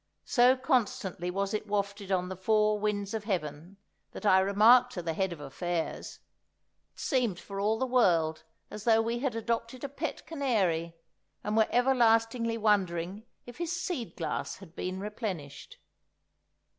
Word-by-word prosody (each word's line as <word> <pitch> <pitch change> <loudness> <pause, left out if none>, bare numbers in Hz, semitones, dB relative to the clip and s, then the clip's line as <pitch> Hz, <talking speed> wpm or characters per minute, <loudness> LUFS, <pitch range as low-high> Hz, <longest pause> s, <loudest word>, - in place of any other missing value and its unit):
So 250 +1 +4
constantly 200 -8 0
was 195 +2 -2
it 215 0 -2
wafted 200 -1 -2
on 180 -1 +1
the 190 - -5
four 210 +2 +2
winds 205 -1 -2
of 220 -2 -3
heaven, 175 -2 -4 0.4
that - - -8
I 190 -2 +6
remarked 225 +6 +5
to 175 - -5
the 165 -1 -2
Head 190 +2 -1
of 170 - -7
Affairs: 165 +4 -4 0.8
it - - -17
seemed 240 -9 0
for 195 -1 -7
all 215 +2 +1
the 260 - 0
world 175 -11 +2 0.3
as 210 - -7
though 225 -1 +5
we 230 +1 -1
had 260 -3 -1
adopted 230 +2 -3
a 280 - -3
pet 295 +3 -5
canary, 190 - 0 0.5
and 210 +1 -1
were 220 -1 +4
everlastingly 230 -2 +3
wondering 200 -1 0 0.2
if 245 +3 -11
his 345 0 -2
seed 340 - -4
glass 160 -3 -3
had 185 -3 -14
been 185 +1 -4
replenished. 195 - -6
210 Hz, 155 wpm, -30 LUFS, 185-235 Hz, 0.8 s, I